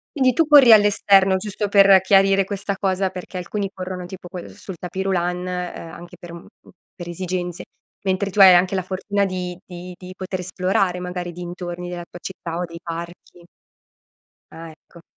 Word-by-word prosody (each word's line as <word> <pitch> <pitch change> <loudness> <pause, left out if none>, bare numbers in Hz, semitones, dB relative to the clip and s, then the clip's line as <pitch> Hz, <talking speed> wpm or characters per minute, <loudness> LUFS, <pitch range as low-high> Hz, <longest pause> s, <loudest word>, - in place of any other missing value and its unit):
Quindi 260 -3 +3
tu 325 +7 +2
corri 285 -5 +7
all'esterno, 200 -2 +5
giusto 205 +1 -4
per 195 -1 +7
chiarire 195 0 +4
questa 200 0 -4
cosa, 190 -1 0
perché 185 0 -8
alcuni 195 +2 -4
corrono 185 -1 -6
tipo 180 0 -10
co 180 +1 -9
uhm, 175 - -7
sul 190 - -10
tapis 180 +3 -5
roulant, 180 -2 -1
uhm, 180 -2 -5
anche 175 +1 -12
per 175 - -11
un 170 - -9
m - - -22 0.3
per 175 -1 -8
esigenze, 180 0 -4 0.4
mentre 190 +1 0
tu 200 - -5
hai 190 -2 +10
anche 180 +2 +3
la 185 - -1
fortuna 200 +2 -1
di 180 -2 -4
di 180 0 -9
di 185 0 -10
poter 185 -1 -5
esplorare 185 0 -1
magari 180 0 -5
i - - -6
dintorni 175 0 -7
della 175 -1 -6
tua 175 - -12
città 170 -3 -6
o 180 - -1
dei 170 -1 -10
parchi. 170 +1 -8 1.1
Ah, 165 0 -10
ecco. 165 +2 -19
185 Hz, 185 wpm, -21 LUFS, 175-195 Hz, 1.1 s, hai